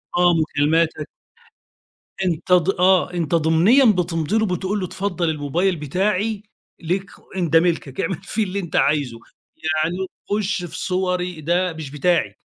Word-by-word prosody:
آآ، 175 Hz, -, +2 dB
آه، 175 Hz, -, +5 dB
مكالماتك 155 Hz, 0 st, +1 dB, 1.2 s
أنتَ 170 Hz, 0 st, -2 dB
ض 180 Hz, 0 st, +4 dB
آه، 185 Hz, -1 st, +4 dB
أنتَ 170 Hz, -2 st, 0 dB
ضمنيًا 165 Hz, -, +4 dB
بتمضي 180 Hz, -2 st, +1 dB
له، 220 Hz, -, +2 dB
بتقول 190 Hz, +2 st, -2 dB
له 185 Hz, -, -2 dB
اتفضل 180 Hz, -2 st, -2 dB
الموبايل 160 Hz, +5 st, 0 dB
بتاعي 195 Hz, +7 st, -1 dB, 0.4 s
ليك 185 Hz, +4 st, -3 dB, 0.2 s
إن 175 Hz, -4 st, -1 dB
ده 165 Hz, -, +6 dB
ملكك، 165 Hz, -6 st, -1 dB
اعمل 165 Hz, 0 st, -2 dB
فيه 220 Hz, 0 st, -1 dB
اللي 195 Hz, 0 st, -3 dB
أنتَ 175 Hz, -4 st, -6 dB
عايزه، 140 Hz, -5 st, +1 dB, 0.4 s
يعني 160 Hz, +2 st, -1 dB, 0.3 s
خش 205 Hz, -3 st, -1 dB
في 160 Hz, -1 st, -8 dB
صوري، 180 Hz, -2 st, -2 dB
ده 175 Hz, +3 st, 0 dB
مش 155 Hz, -4 st, -8 dB
بتاعي، 170 Hz, +4 st, +1 dB
175 Hz, 150 wpm, -21 LUFS, 160-190 Hz, 1.2 s, ده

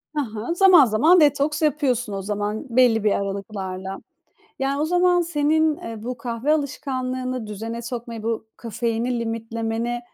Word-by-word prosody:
Ha 295 Hz, -, +1 dB
ha. 225 Hz, +11 st, -3 dB
Zaman 355 Hz, -6 st, +7 dB
zaman 305 Hz, +12 st, +4 dB
detoks 295 Hz, +1 st, +2 dB
yapıyorsun 255 Hz, -7 st, 0 dB
o 195 Hz, -, -3 dB
zaman 210 Hz, +4 st, -3 dB
belli 230 Hz, -3 st, +4 dB
bir 210 Hz, -, +3 dB
aralıklarla. 195 Hz, -1 st, -4 dB, 0.6 s
Yani, 275 Hz, +2 st, 0 dB
o -, -, +2 dB
zaman 355 Hz, +1 st, +3 dB
senin, 315 Hz, -1 st, +1 dB
eee, 225 Hz, -1 st, -8 dB
bu 250 Hz, 0 st, -4 dB
kahve 235 Hz, +4 st, -2 dB
alışkanlığını 255 Hz, -4 st, -3 dB
düzene 225 Hz, +3 st, -5 dB
sokmayı, 230 Hz, -2 st, -6 dB
bu 225 Hz, -1 st, -2 dB
kafeini 235 Hz, +1 st, -2 dB
limitlemeni, 230 Hz, +1 st, -3 dB
240 Hz, 140 wpm, -23 LUFS, 225-290 Hz, 0.6 s, Zaman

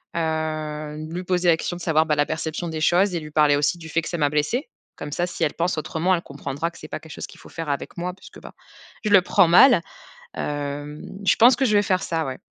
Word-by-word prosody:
Heu, 155 Hz, -2 st, -3 dB
lui 180 Hz, +2 st, -4 dB
poser 180 Hz, -1 st, 0 dB
la 160 Hz, -, +5 dB
question 175 Hz, -, -4 dB
de -, -, -11 dB
savoir, 160 Hz, -2 st, +2 dB
bah, 155 Hz, -2 st, +1 dB
la 145 Hz, 0 st, +2 dB
perception 160 Hz, +2 st, -3 dB
des 160 Hz, -1 st, -4 dB
choses 180 Hz, +4 st, +3 dB
et -, -, 0 dB
lui 155 Hz, -1 st, -10 dB
parler 150 Hz, -1 st, +4 dB
aussi 145 Hz, +4 st, +1 dB
du 160 Hz, -1 st, -10 dB
fait 165 Hz, +2 st, +1 dB
que 155 Hz, -, -7 dB
ça 175 Hz, -, -3 dB
m'a 145 Hz, -1 st, +3 dB
blessé. 150 Hz, -, -1 dB, 0.3 s
Comme 145 Hz, -, -7 dB
ça, 175 Hz, -, 0 dB
si 175 Hz, -1 st, -4 dB
elle 150 Hz, -, +1 dB
pense 170 Hz, 0 st, -1 dB
autrement, 170 Hz, +3 st, 0 dB
elle 170 Hz, -, -3 dB
comprendra 140 Hz, +2 st, -4 dB
que -, -, -16 dB
c'est -, -, -10 dB
pas -, -, -5 dB
quelque 160 Hz, -, -14 dB
chose -, -, -6 dB
qu'il -, -, -16 dB
faut -, -, -14 dB
faire 165 Hz, -2 st, -6 dB
avec 140 Hz, +4 st, -4 dB
moi 180 Hz, +1 st, -3 dB
puisque, 185 Hz, -, -14 dB
bah, -, -, -12 dB, 0.5 s
je 215 Hz, -, 0 dB
le 200 Hz, -2 st, +7 dB
prends 175 Hz, -, +4 dB
mal. 195 Hz, +4 st, +7 dB, 0.5 s
Hem, 145 Hz, 0 st, -4 dB, 0.2 s
je 190 Hz, -, +4 dB
pense 240 Hz, +2 st, +7 dB
que 270 Hz, -, -1 dB
je 215 Hz, -4 st, +2 dB
vais -, -, +5 dB
faire 185 Hz, -2 st, 0 dB
ça, 165 Hz, -1 st, -1 dB
ouais. 130 Hz, -1 st, -5 dB
160 Hz, 265 wpm, -23 LUFS, 150-180 Hz, 0.5 s, le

